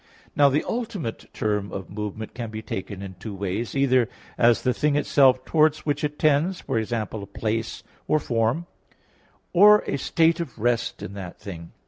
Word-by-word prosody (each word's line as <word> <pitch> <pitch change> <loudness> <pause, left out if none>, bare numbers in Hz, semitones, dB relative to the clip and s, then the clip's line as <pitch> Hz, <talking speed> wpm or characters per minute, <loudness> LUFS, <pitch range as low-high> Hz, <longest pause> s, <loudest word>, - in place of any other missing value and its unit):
Now 145 -1 +6
the 145 +3 +1
ultimate 220 - -4
term 105 -2 -1
of 95 -1 -6
movement 105 +1 -5
can 120 -2 -5
be 110 0 -7
taken 95 0 -5
in 95 -1 -7
two 105 0 -6
ways, 100 +6 -3
either 130 -3 +3 0.3
as 120 -1 +4
the 125 - +2
thing 150 +4 +1
itself 130 -3 +4
towards 155 -1 +2
which 145 -1 -1
it 150 0 -2
tends, 155 +5 +2
e.g. 110 +1 -1
a 110 -2 -1 0.2
place 110 +3 -3 0.2
or 155 - +3
form; 120 +4 0 0.9
or 210 +4 +7
a 140 - -2
state 165 +4 +2
of 160 -8 -5
rest 115 +1 -1
in 95 - -6
that 95 -3 -8
thing. 85 -4 -9
120 Hz, 170 wpm, -24 LUFS, 105-150 Hz, 0.9 s, or